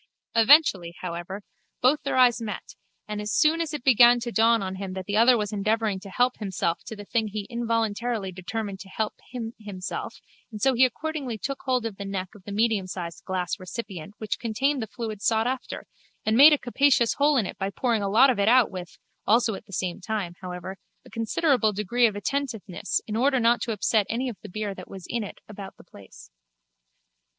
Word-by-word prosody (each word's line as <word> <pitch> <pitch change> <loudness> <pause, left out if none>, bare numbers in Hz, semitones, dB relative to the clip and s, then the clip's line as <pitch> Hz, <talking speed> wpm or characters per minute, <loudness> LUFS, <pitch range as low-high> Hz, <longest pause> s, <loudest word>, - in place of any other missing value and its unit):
Eventually, 225 - +5
however, 180 +3 -5 0.4
both 280 +5 +3
their 275 - -2
eyes 245 -2 +5
met 210 -3 -6 0.3
and 210 0 -4
as 210 0 -3
soon 320 +2 +3
as 325 -3 -2
it 300 -5 -5
began 245 -1 +6
to 235 0 -4
dawn 225 -1 +3
on 190 0 -4
him 190 -1 -5
that 190 -1 -5
the 205 - -2
other 235 +3 +6
was 210 -1 -3
endeavouring 215 0 0
to 195 +1 -11
help 245 +5 +1
himself 185 -5 -1
to 220 - -6
the 205 -1 -10
thing 225 0 0
he 210 0 -5
involuntarily 230 -2 -1
determined 195 +2 -5
to 195 - -11
help 215 +2 -2 0.2
him 235 -2 -5
himself 195 -4 -6 0.4
and 215 - -7
so 265 +4 +3
he 255 +2 +5
accordingly 275 -2 -3
took 275 +5 -4
hold 255 -3 +1
of 215 -4 -4
the 200 - -5
neck 190 -2 -4
of 200 -3 -17
the 205 - -7
mediumsized 195 -6 -1
glass 185 +1 -2
recipient 185 -1 -7
which 215 - -3
contained 260 +5 0
the 220 - -4
fluid 215 -2 -6
sought 220 +1 +2
after 255 +1 -4 0.4
and 220 - +2
made 285 +6 +9
a 295 - +5
capacious 255 -2 +2
hole 290 0 +4
in 225 - +2
it - - -7
by 195 0 -1
pouring 230 +1 0
a 200 - -1
lot 245 +7 +6
of 235 - -3
it 200 - +2
out 245 -1 +5
with, 180 -2 -8 0.3
also 225 +1 +3
at 195 - -9
the - - -15
same 185 0 -3
time, 195 -3 -3
however, 180 +1 -6 0.3
a - - -16
considerable 230 0 +1
degree 230 +4 +2
of 210 - -4
attentiveness 220 -4 -2
in 215 - -4
order 260 +3 +2
not 235 +1 +3
to 235 - -2
upset 215 -1 +1
any 250 +3 -1
of 225 - -8
the - - -10
beer 210 +1 -3
that - - -11
was 190 -3 -9
in 235 -2 -2
it 205 - -8
about 200 -2 -9
the - - -15
place. 100 - -15
220 Hz, 210 wpm, -26 LUFS, 195-245 Hz, 0.4 s, made